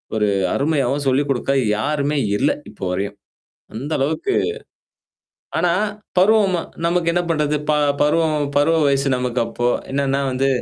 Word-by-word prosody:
ஒரு 105 -1 +2 0.3
அருமையாவும் 140 -1 0
சொல்லிக் 140 +2 +2
குடுக்க 135 +1 0 0.3
யாருமே 145 +4 -1 0.2
இல்ல, 140 - +2 0.2
இப்ப - - -18
வரையும். 100 +2 -3 0.6
அந்த 140 +7 -5
அளவுக்கு 320 - 0 1.3
ஆனா, 175 - +2 0.5
பருவமா 195 -3 +4 0.3
நமக்கு 170 -1 +1
என்ன 175 +1 +1
பண்றது? 150 -2 +1
ப - - +4 0.3
பருவம் 155 -1 +2
பருவ 160 +3 +3
வயசு 140 0 +2
நமக்கு 125 -1 -1
அப்போ. 120 +1 -1 0.2
என்னன்னா 140 0 0
வந்து, 135 +2 0
145 Hz, 130 wpm, -20 LUFS, 135-160 Hz, 1.3 s, பருவமா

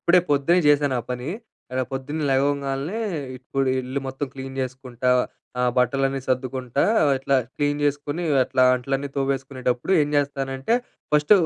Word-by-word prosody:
ఇప్పుడే 175 +1 +5
పొద్దున్నే 145 +5 +4
జేశాను 145 -2 +4
ఆ - - -10
పని. 125 +2 -3 0.4
ఎడ 130 - 0
పొద్దున్నే 145 +4 -3
లెగవంగాల్నే, 140 +6 0 0.4
ఇప్పుడు 135 +1 -1
ఇల్లు 130 +2 -3
మొత్తం 135 +2 -3
క్లీన్ 135 0 -7
జేసుకుంటా, 130 -1 -3 0.5
ఆహ్, 125 0 +3
బట్టలన్నీ 135 +1 +1
సర్దుకుంటా, 130 0 -1 0.4
ఇట్లా 135 +1 +2 0.2
క్లీన్ 145 0 0
జేసుకునీ, 145 +3 -1 0.2
అట్లా 130 0 +2
అంట్లన్నీ 135 +2 -2
తోవేసుకునేటప్పుడు 135 0 -1
ఏం 145 - +2
జేస్తానంటే, 135 - 0 0.4
ఫస్ట్ 150 +4 +5
135 Hz, 130 wpm, -24 LUFS, 130-145 Hz, 0.5 s, ఇప్పుడే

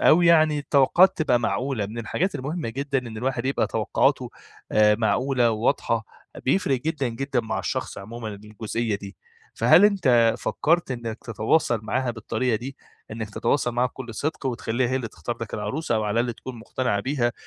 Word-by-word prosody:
أو 175 - +6
يعني 155 -3 +5
التوقعات 145 +7 +4
تبقى 130 -6 +3
معقولة 120 -2 -1
من 115 +3 -8
الحاجات 180 - -1
المهمّة 145 +1 -3
جدًا 140 +3 -1
إن 115 -3 -7
الواحد 125 +1 -2
يبقى 135 - +1
توقعاته - - +1 0.4
آآ، 105 0 +5
معقولة 120 +3 +2
وواضحة 115 0 0 0.4
بيفرق 135 -3 +1
جدًا 150 -3 -1
جدًا 135 +2 -1
مع 110 -1 -3
الشخص - - -3
عمومًا 110 +3 -7
الجزئية 105 +2 -4
دي، 100 0 -10 0.4
فهل 165 +6 +6
أنتَ 130 - +4
فكّرت 170 -1 +1
إنك 115 -3 -4
تتواصل 115 +2 +1
معاها 125 +4 -1
بالطريقة 115 +1 -1
دي؟ 130 +5 -7 0.3
إنك 110 -1 -5
تتواصل 120 +3 0
معاها 125 +1 +2
بكلّ 120 -1 -9
صدق 150 +2 -3
وتخلّيها 120 0 -1
هي 130 - +1
اللي 125 -3 -3
تختار 85 -6 -6
لك - - -5
العروسة، 155 -4 -2
أو 110 -1 0
على 105 +2 +1
الأقل 120 0 -1
تكون 130 +2 -9
مقتنعة 120 -2 -1
بيها، 120 0 0
120 Hz, 170 wpm, -24 LUFS, 110-140 Hz, 0.4 s, أو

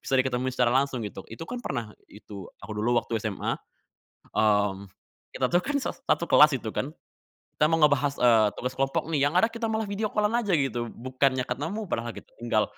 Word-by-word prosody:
bisa 135 - 0
diketemuin 130 0 -1
secara 125 -1 +2
langsung 135 -2 +1
gitu. 100 -2 -7
Itu 115 +8 -7
kan 245 0 -5
pernah, 115 -3 -4 0.2
itu, 100 -2 -10
aku 110 +1 -8
dulu 120 +3 +1
waktu 115 - -3
SMA, 105 -3 -2 0.8
mmm, 100 -2 +2 0.5
kita - - +1
tuh 175 +1 +3
kan 290 +1 -1
sas - - -4
satu 170 - +2
kelas 150 -1 +7
itu 110 - -5
kan, 140 - -2 0.7
kita 150 - +4
mau 165 - +3
ngebahas, 145 -1 +4
eee, 115 -3 +5
tugas 125 +1 -3
kelompok, 135 +2 0
nih, 145 -3 +2
yang 160 - -9
ada 225 - +4
kita 230 0 -3
malah 220 0 -1
video 210 +1 -1
call-an 210 +2 +1
aja 205 -6 0
gitu, 120 -4 -1
bukannya 130 +1 0
ketemu 160 - -3
padahal 115 -5 -2
kita - - -12
tinggal 110 -3 +2
130 Hz, 195 wpm, -27 LUFS, 115-160 Hz, 0.8 s, kelas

